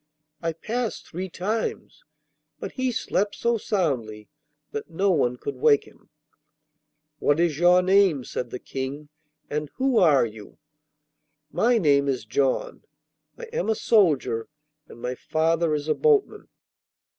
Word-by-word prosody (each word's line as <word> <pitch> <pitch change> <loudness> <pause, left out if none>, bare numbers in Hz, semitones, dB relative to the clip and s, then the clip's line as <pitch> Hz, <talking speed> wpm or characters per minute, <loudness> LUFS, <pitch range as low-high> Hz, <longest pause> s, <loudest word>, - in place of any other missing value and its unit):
I 165 -1 -1
passed 225 +8 -4
three 185 +3 -6
times, 210 +6 -4 0.6
but - - -6
he 260 -1 -1
slept 205 -3 -1
so 235 -1 0
soundly 125 - -2 0.4
that 145 - -5
no 190 +4 +1
one 125 -7 +1
could 140 +1 -6
wake 140 +2 +4
him.' - - -21 1.1
'What 145 +2 +2
is 165 -4 +1
your 180 +1 +5
name?' 185 -7 +3
said 125 0 -5
the 125 - -5
King, 135 +4 -6 0.4
'and 150 0 -3
who 265 -3 +2
are 150 -8 +5
you?' 110 -2 -11 0.9
'My 240 +1 +3
name 140 -7 +3
is 130 -5 -1
John. 130 +4 -1 0.5
I - - -10
am 470 - -1
a 220 - +2
soldier, 155 - +2 0.4
and - - -13
my 125 +1 -3
father 160 +3 0
is 145 0 -4
a 155 - +3
boatman. 440 -3 +1
160 Hz, 140 wpm, -25 LUFS, 135-200 Hz, 1.1 s, your